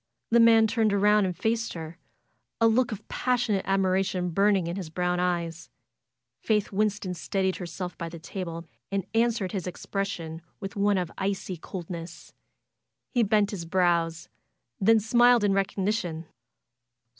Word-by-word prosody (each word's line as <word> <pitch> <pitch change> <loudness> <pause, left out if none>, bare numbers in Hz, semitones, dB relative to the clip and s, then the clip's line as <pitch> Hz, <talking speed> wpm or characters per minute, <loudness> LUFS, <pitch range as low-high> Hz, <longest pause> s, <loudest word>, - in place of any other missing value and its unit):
The 235 - +6
man 225 -1 +7
turned 220 -1 +1
around 205 0 +4
and 180 -3 -3
faced 230 +3 -1
her, 165 +1 -8 0.6
a 230 - +5
look 235 +2 +2
of 210 - -7
passionate 240 -6 0
admiration 190 -2 +1
burning 195 0 +3
in 170 +1 -3
his 185 -5 -5
brown 180 +2 -1
eyes. 170 -2 -2 0.7
Faith 210 -2 +1
Winston 205 -2 0
steadied 190 +1 -1
herself 180 0 -6
by 170 -1 -4
the 170 - -9
table 170 -1 -6 0.3
and 195 -2 -1
answered 225 -4 +1
his 190 -4 -3
expression 180 -3 -4 0.2
with 195 -1 -6
one 205 0 +2
of 180 -3 -2
icy 195 -1 -2
coldness. 170 0 -8 0.8
He 245 - +2
bent 210 -1 +2
his 190 -5 -5
brows 170 -1 +1 0.5
and 190 - -1
then 225 0 +7
smiled 240 +2 +4
in 200 -1 +3
recognition. 195 -3 -1
195 Hz, 145 wpm, -27 LUFS, 175-210 Hz, 0.8 s, man